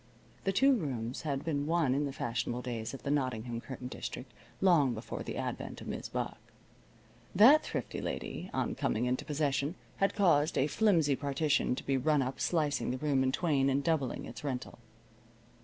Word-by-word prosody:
The 195 Hz, -, +3 dB
two 270 Hz, +8 st, +5 dB
rooms 125 Hz, -, -3 dB
had 145 Hz, -1 st, -3 dB
been 145 Hz, -3 st, -1 dB
one 160 Hz, -5 st, +2 dB
in 145 Hz, +2 st, +1 dB
the -, -, -4 dB
fashionable 120 Hz, -1 st, -2 dB
days 120 Hz, 0 st, -4 dB
of -, -, -11 dB
the 140 Hz, -, -1 dB
Nottingham 120 Hz, -4 st, -1 dB
curtain 130 Hz, -1 st, -7 dB
district, 125 Hz, 0 st, -6 dB, 0.3 s
long 150 Hz, -10 st, +4 dB
before 110 Hz, -, -6 dB
the -, -, -5 dB
advent -, -, -4 dB
of -, -, -9 dB
Mis' -, -, -4 dB
Buck. -, -, -3 dB, 1.0 s
That 260 Hz, +11 st, +8 dB
thrifty -, -, -4 dB
lady, -, -, -4 dB
on -, -, -1 dB
coming 115 Hz, +3 st, 0 dB
into 125 Hz, +1 st, 0 dB
possession, 145 Hz, +1 st, 0 dB, 0.2 s
had 195 Hz, -, +1 dB
caused 165 Hz, -6 st, +3 dB
a 135 Hz, -, +4 dB
flimsy 160 Hz, -4 st, +3 dB
partition 145 Hz, -1 st, +1 dB
to -, -, -6 dB
be 135 Hz, -1 st, +1 dB
run 145 Hz, +1 st, +2 dB
up, 130 Hz, +1 st, -4 dB
slicing 150 Hz, -5 st, 0 dB
the 130 Hz, -, -1 dB
room 140 Hz, -1 st, +1 dB
in 130 Hz, 0 st, +2 dB
twain 145 Hz, -3 st, +2 dB
and 135 Hz, +1 st, +1 dB
doubling 145 Hz, -6 st, 0 dB
its 115 Hz, +2 st, -9 dB
rental. 130 Hz, -4 st, -4 dB
140 Hz, 180 wpm, -32 LUFS, 130-155 Hz, 1.0 s, That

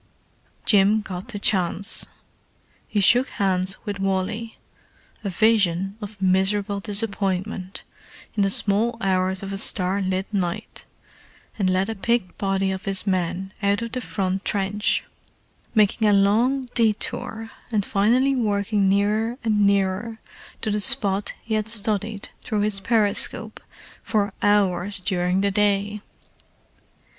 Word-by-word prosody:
Jim 205 Hz, +1 st, +4 dB
got 190 Hz, 0 st, -7 dB
the 230 Hz, -5 st, -4 dB
chance. 195 Hz, 0 st, 0 dB, 0.8 s
He 210 Hz, -, -1 dB
shook 245 Hz, +6 st, +4 dB
hands 190 Hz, -1 st, -1 dB
with 205 Hz, -2 st, -4 dB
Wally—a 200 Hz, +2 st, -5 dB
vision 195 Hz, -2 st, +2 dB
of 205 Hz, 0 st, -8 dB
miserable 195 Hz, +2 st, +1 dB
disappointment—in 200 Hz, -1 st, -3 dB
the 195 Hz, -, +3 dB
small 210 Hz, +4 st, +1 dB
hours 190 Hz, -1 st, 0 dB
of 195 Hz, 0 st, -5 dB
a -, -, -2 dB
starlit 190 Hz, -2 st, 0 dB
night, 180 Hz, -4 st, -3 dB, 0.7 s
and 190 Hz, -2 st, +2 dB
led 185 Hz, +1 st, +1 dB
a 225 Hz, -, -2 dB
picked 220 Hz, -2 st, -1 dB
body 195 Hz, -1 st, 0 dB
of 190 Hz, 0 st, -5 dB
his 195 Hz, 0 st, -1 dB
men 185 Hz, 0 st, -1 dB
out 200 Hz, +2 st, +1 dB
of 230 Hz, -, -5 dB
the 255 Hz, -, -3 dB
front 195 Hz, -3 st, -2 dB
trench: 205 Hz, +1 st, 0 dB, 0.7 s
making 215 Hz, +1 st, +3 dB
a 205 Hz, -, +4 dB
long 235 Hz, +7 st, +2 dB
detour 225 Hz, 0 st, -1 dB, 0.2 s
and 210 Hz, -3 st, +1 dB
finally 245 Hz, +7 st, +2 dB
working 205 Hz, -3 st, +1 dB
nearer 210 Hz, +4 st, +1 dB
and 210 Hz, -3 st, +3 dB
nearer 200 Hz, +3 st, 0 dB, 0.4 s
to 215 Hz, -, -1 dB
the 210 Hz, 0 st, 0 dB
spot 200 Hz, 0 st, +2 dB
he 220 Hz, -, -4 dB
had 215 Hz, 0 st, 0 dB
studied 215 Hz, -1 st, +1 dB
through 215 Hz, -3 st, -2 dB
his 205 Hz, -1 st, +1 dB
periscope 210 Hz, 0 st, +1 dB, 0.4 s
for 205 Hz, -2 st, -1 dB
hours 200 Hz, -1 st, +2 dB
during 180 Hz, 0 st, 0 dB
the 200 Hz, 0 st, +1 dB
day. 205 Hz, 0 st, +1 dB
200 Hz, 125 wpm, -23 LUFS, 190-215 Hz, 0.8 s, Jim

